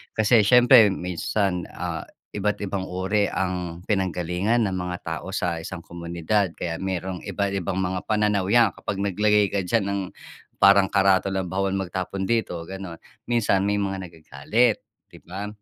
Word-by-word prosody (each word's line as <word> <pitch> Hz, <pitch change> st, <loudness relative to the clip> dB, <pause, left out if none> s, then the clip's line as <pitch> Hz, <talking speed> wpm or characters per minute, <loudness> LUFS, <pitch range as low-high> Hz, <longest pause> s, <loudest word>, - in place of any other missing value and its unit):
Kasi 110 Hz, 0 st, +4 dB
siyempre 125 Hz, -1 st, +7 dB
minsan, 90 Hz, 0 st, -2 dB
ah, -, -, -4 dB, 0.2 s
iba't 105 Hz, 0 st, -2 dB
ibang 95 Hz, -1 st, -3 dB
uri 95 Hz, +3 st, 0 dB
ang 90 Hz, -2 st, -3 dB
pinanggalingan 95 Hz, +3 st, 0 dB
ng 95 Hz, -2 st, -1 dB
mga 90 Hz, 0 st, -4 dB
tao 80 Hz, +2 st, -5 dB
sa 85 Hz, -3 st, -1 dB
isang 85 Hz, +1 st, -7 dB
komunidad. 85 Hz, +2 st, -2 dB
Kaya 85 Hz, -1 st, -4 dB
merong 95 Hz, -1 st, -3 dB
iba't 100 Hz, -1 st, -1 dB
ibang 95 Hz, -2 st, -2 dB
mga 90 Hz, 0 st, -2 dB
pananaw 105 Hz, -3 st, +1 dB
yan 115 Hz, 0 st, +4 dB
kapag 100 Hz, -, -5 dB
naglagay 105 Hz, 0 st, +2 dB
ka 100 Hz, -, 0 dB
diyan 110 Hz, +1 st, +1 dB
ng 100 Hz, 0 st, -1 dB, 0.6 s
parang 100 Hz, -1 st, +5 dB
karatula 95 Hz, 0 st, +2 dB
bawal 95 Hz, +2 st, -1 dB
magtapon 95 Hz, 0 st, -3 dB
dito 115 Hz, -6 st, 0 dB
ganon 95 Hz, -3 st, -8 dB, 0.3 s
minsan 100 Hz, -5 st, +2 dB
may 100 Hz, 0 st, +1 dB
mga 100 Hz, -1 st, -1 dB
nagagalit, 85 Hz, -, 0 dB, 0.2 s
di -, -, -18 dB
ba? 95 Hz, +4 st, -6 dB
95 Hz, 150 wpm, -24 LUFS, 90-105 Hz, 0.6 s, siyempre